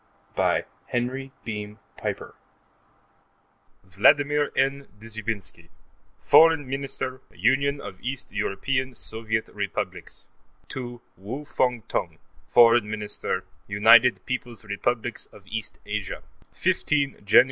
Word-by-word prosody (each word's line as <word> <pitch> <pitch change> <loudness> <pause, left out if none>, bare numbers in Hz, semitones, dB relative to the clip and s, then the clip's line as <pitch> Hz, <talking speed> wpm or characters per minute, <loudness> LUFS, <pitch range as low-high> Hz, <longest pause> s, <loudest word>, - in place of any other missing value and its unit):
P. - - -37 0.3
By - - +2 0.3
H. 130 +2 -1 0.2
Beam 105 -1 -5 0.2
Piper - - -4 1.5
_Vladmir 145 - +4
N. 135 +1 +1
Dzhoubinsky, 110 -6 -5 0.5
Foreign 160 -4 +6
Minister, 135 -1 -3
Union 135 +8 +2
of 95 -6 -9
East 130 +1 -4
European 130 +6 -1
Soviet 110 0 -1
Republics, 100 -1 -4 0.4
to 120 -2 -6 0.2
Wu 120 +10 -6
Fung 125 -5 0
Tung, - - -2 0.3
Foreign 115 -2 +6
Minister, 105 -1 -2 0.2
United 110 +4 +6
Peoples' 120 -3 -4
Republics 115 +3 -2
of 100 - -16
East 110 +2 -4
Asia_: 105 -2 -4 0.3
15 140 -2 +1
Jan. 100 - +7
120 Hz, 105 wpm, -25 LUFS, 105-135 Hz, 1.5 s, Jan